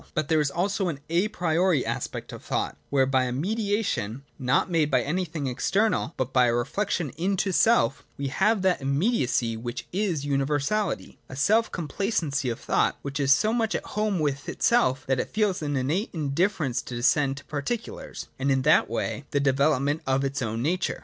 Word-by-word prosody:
But 155 -3 -1
there 160 -1 +4
is 145 - +1
also 195 +5 -1
an 155 -5 -3
a 175 +5 +3
priori 175 -5 +1
aspect - - -4
of - - -9
thought, - - -2
where 135 -2 +3
by 130 -1 +2
a 125 - -2
mediation, 195 - -1 0.2
not 130 +2 +2
made 165 -4 +1
by 140 - +2
anything 160 -1 -2
external 175 - 0
but 130 0 -2
by 125 -1 +5
a 120 - +2
reflection 170 - -1
into 190 +2 0
self 225 - +3
we 140 -1 -2
have 215 +7 +2
that 185 -5 +2
immediacy 135 - +1
which 120 +2 -5
is 180 -7 -1
universality, 145 +9 -1
the - - -9
self 215 +11 +2
complacency 160 - -1
of 115 - -4
thought - - +1
which 140 +1 -4
is 140 -1 +2
so 215 +11 +4
much 225 -2 0
at - - -3
home 210 -2 0
with 145 -3 -1
itself 235 - +2
that 135 -1 +1
it - - -2
feels 210 -5 0
an 145 -1 -2
innate 155 - 0
in 150 -4 -2
difference 160 - +1
to 125 - -7
descend 135 +3 +2
to 145 - -10
particulars, 155 +11 -5
and 135 +1 0
in 135 -1 +2
that 155 +4 +4
way 140 - -3
to - - -20
the 145 - +3
development 140 +2 +2
of 135 +1 +2
its 135 0 -2
own 115 0 -2
nature. 175 +5 -1
150 Hz, 190 wpm, -26 LUFS, 135-190 Hz, 0.2 s, by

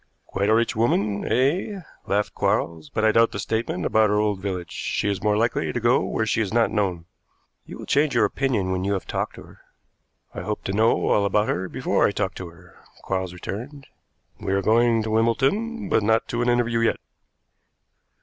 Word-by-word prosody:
"Quite 100 +2 -1
a 110 - +5
rich 115 +1 +1
woman, 105 -3 0
eh?" 165 - +1 0.3
laughed 105 +1 0
Quarles. 80 -3 -1
"But 110 - -1
I 110 - +5
doubt 115 +1 +3
the - - -4
statement 100 -1 -2
about 110 -1 +3
her 105 - +2
old 105 -2 0
village. 90 -3 -4
She - - -2
is 100 -3 -1
more 105 0 +2
likely 115 +2 0
to - - -2
go 120 +2 +3
where 110 - -1
she 110 - 0
is 105 - -2
not 115 0 +2
known." 95 -6 -1 0.6
"You - - -8
will - - -9
change 145 0 +1
your - - +4
opinion 115 -9 -1
when 95 0 -1
you 100 +1 0
have 95 - -3
talked - - -3
to - - -11
her." - - -18 0.7
"I - - -5
hope 105 0 -4
to 95 - -3
know 110 +3 +2
all 105 - +3
about 105 +1 +1
her 95 +1 -2
before - - +1
I - - 0
talk 100 -1 -2
to 90 - -6
her," 85 +1 -18 0.3
Quarles 95 -2 -2
returned. 120 - -7 0.5
"We 100 -2 -2
are 100 0 +1
going 115 +1 +3
to 110 - -3
Wimbledon, 145 - +1
but 130 -9 +2
not 110 +2 +1
to 120 -2 -1
an 120 - +1
interview 120 -1 +1
yet." 115 - +2
110 Hz, 205 wpm, -23 LUFS, 100-120 Hz, 0.7 s, a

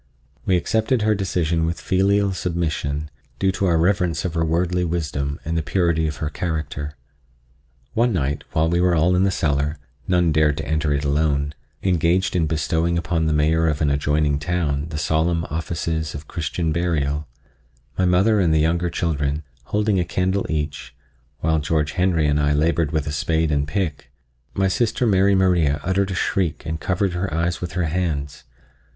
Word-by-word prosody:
We 90 - +4
accepted 110 +5 +1
her 110 0 +3
decision 85 -5 0
with 85 -1 -3
filial 100 +1 +2
submission, 75 -3 -2 0.3
due 95 -1 +2
to 95 +1 -1
our 85 -2 +3
reverence 90 0 +1
for 90 - 0
her 80 0 0
wordly 90 +2 0
wisdom 75 -4 -2
and 80 +1 -2
the 80 - +1
purity 80 +1 +1
of 75 - -3
her 75 - -3
character. 75 -3 -4 1.0
One 120 +2 +2
night 75 -6 -1
while 80 +1 +2
we 85 +1 +1
were 90 -1 +3
all 85 +3 +3
in 95 +2 +3
the - - +3
cellar—none 75 +1 -1
dared 75 -1 +2
to 80 - -4
enter 80 -1 0
it 70 0 0
alone—engaged 80 +5 0
in 85 -3 +2
bestowing 80 +2 0
upon 85 -1 0
the - - +1
Mayor 80 +2 +2
of 75 -2 0
an 75 -3 +2
adjoining 75 +1 +1
town 75 -3 -1
the 75 - -5
solemn 80 +3 +1
offices 80 -1 -2
of 75 0 -8
Christian 80 0 -2
burial, 75 -3 -1 0.7
my 95 - +1
mother 95 +5 +3
and 85 -4 +3
the 80 - +3
younger 85 +3 +1
children, 75 -3 -1 0.2
holding 105 - +1
a - - +2
candle 95 +3 -1
each, 75 -2 -3 0.5
while 80 0 +2
George 75 0 0
Henry 90 -4 +1
and 75 0 +2
I 75 0 +2
labored 80 +1 +1
with 80 -3 -1
a 75 - -3
spade 80 +2 0
and 70 -1 0
pick, 85 -4 -3 0.5
my 95 0 +2
sister 115 +5 +1
Mary 100 -2 +4
Maria 85 -6 +2
uttered 95 +2 +1
a 95 - -3
shriek 90 -3 -1
and 80 0 -3
covered 95 +1 0
her 90 +1 -2
eyes 85 +2 -1
with 90 -1 -4
her 90 -1 0
hands. 80 -4 -2
80 Hz, 175 wpm, -22 LUFS, 75-90 Hz, 1.0 s, We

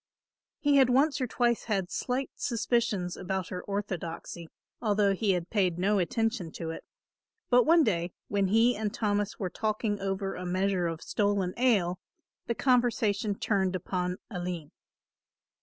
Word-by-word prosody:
He 290 -1 +3
had 265 -2 +6
once 275 +3 +3
or 255 - 0
twice 235 0 +1
had 195 -5 -1
slight 260 +2 -2
suspicions 225 -6 0
about 190 -1 -3
her 180 - -4
orthodoxy, 175 -4 -5 0.3
although 205 -3 +2
he 195 0 +1
had 175 -1 -3
paid 185 -5 +1
no 200 +3 +2
attention 220 -1 -1
to 165 -1 -4
it; - - -7 0.7
but 245 0 +6
one 330 0 +6
day, 175 - 0 0.2
when 200 -1 +1
he 225 +5 +4
and 210 0 -2
Thomas 205 -2 -1
were 185 -4 -3
talking 215 +1 -1
over 195 0 -2
a 180 - -6
measure 185 0 0
of 165 -1 -5
stolen 200 -3 0
ale, 200 -8 +2 0.5
the 235 - 0
conversation 225 -5 +2
turned 190 -3 0
upon 180 0 -2
Aline. 175 -5 -4
200 Hz, 150 wpm, -29 LUFS, 180-230 Hz, 0.7 s, had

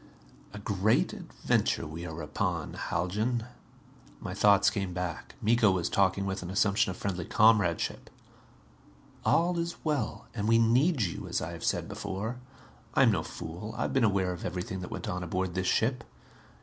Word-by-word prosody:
"A 110 - -8
great 100 +1 +1
adventure - - -1
we 80 +3 -6
are 80 0 -6
upon, 75 0 -2
Haljan." 110 +7 -1 0.7
My - - -5
thoughts 100 -1 +5
came 95 -4 -3
back. 90 -2 -4
Miko 115 0 +4
was 90 -3 +1
talking 100 0 +2
with 95 0 -3
an 90 - -6
assumption 100 0 +2
of 90 - -5
friendly 95 -3 -3
comradeship. 105 -4 +2 1.1
"All 175 +1 +2
is 170 0 -2
well 145 -8 -1
and 105 -2 -2
we 115 0 +5
need 125 +5 +3
you, 90 - -3
as - - 0
I - - -4
have - - -8
said - - 0
before. 110 +6 -4 0.6
I - - +6
am - - +6
no - - +1
fool. 90 +7 -7
I - - 0
have - - -2
been 135 - +3
aware 95 -4 +2
of 90 - -8
everything 90 +1 -4
that 90 - -6
went - - -5
on 90 0 -2
aboard 90 +1 -2
this 95 0 -1
ship. 120 +1 +1
100 Hz, 175 wpm, -29 LUFS, 90-115 Hz, 1.1 s, I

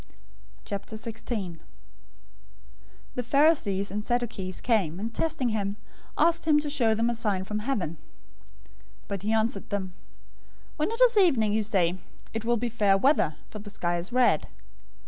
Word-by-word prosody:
016:001 215 -3 -5 1.5
The 250 - -2
Pharisees 245 - +2
and 210 +1 -3
Sadducees 230 -6 -2
came, 190 -9 +1
and 225 +3 -4
testing 310 -5 0
him, 205 -2 -1 0.4
asked 335 -1 +3
him 300 -2 +5
to 295 -1 -3
show 235 -6 +2
them 230 +2 +1
a 240 - +1
sign 210 -5 -1
from 210 +2 -3
heaven. 210 - -2 1.1
016:002 - - -31
But 200 -2 -3
he 210 +2 -1
answered 220 -2 0
them, 190 -3 -3 0.8
"When 305 +4 0
it 455 +2 -4
is 485 -3 +6
evening, 260 - +4
you 220 - +2
say, 190 -4 +1 0.3
'It 225 0 -3
will 240 +1 +2
be 240 +2 -1
fair 205 -4 +3
weather, 195 - +3
for 215 - -9
the 205 0 -9
sky 175 -3 -1
is 175 +6 -6
red.' 245 -11 +3
220 Hz, 155 wpm, -27 LUFS, 195-245 Hz, 1.5 s, is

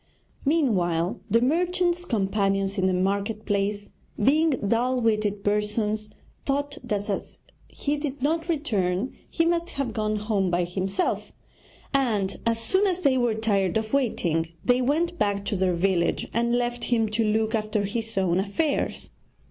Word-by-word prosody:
Meanwhile 185 - +1
the 230 - +4
merchant's 350 +5 +1
companions 195 - 0
in 190 - +3
the 185 - +2
market 200 +3 -1
place, 205 0 -1 0.3
being 305 +9 +4
dull 250 0 +1
witted 210 -3 0
persons, 210 +1 0 0.3
thought 285 +2 -2
that 205 -4 -2
as 200 - -4 0.3
he 295 +1 -2
did 285 -1 -4
not 325 +3 0
return 220 - 0
he 330 - +1
must 340 0 +1
have 270 -5 -3
gone 215 0 0
home 210 -3 0
by 175 0 +1
himself; 190 +2 -2 0.6
and 215 -8 +1
as 230 0 +2
soon 380 - +2
as 370 -1 -1
they 280 -5 +3
were 240 -3 +2
tired 200 -4 +1
of 220 +1 -3
waiting 175 - +1 0.2
they 250 0 +4
went 335 +7 0
back 200 -1 0
to 205 - -1
their 185 -1 +1
village 180 0 +1
and 235 +1 +1
left 240 -1 -1
him 225 -2 +2
to 220 +2 +1
look 220 +1 +1
after 215 -1 0
his 225 +1 -4
own 185 -2 +2
affairs. 280 +10 -1
220 Hz, 155 wpm, -25 LUFS, 200-275 Hz, 0.6 s, the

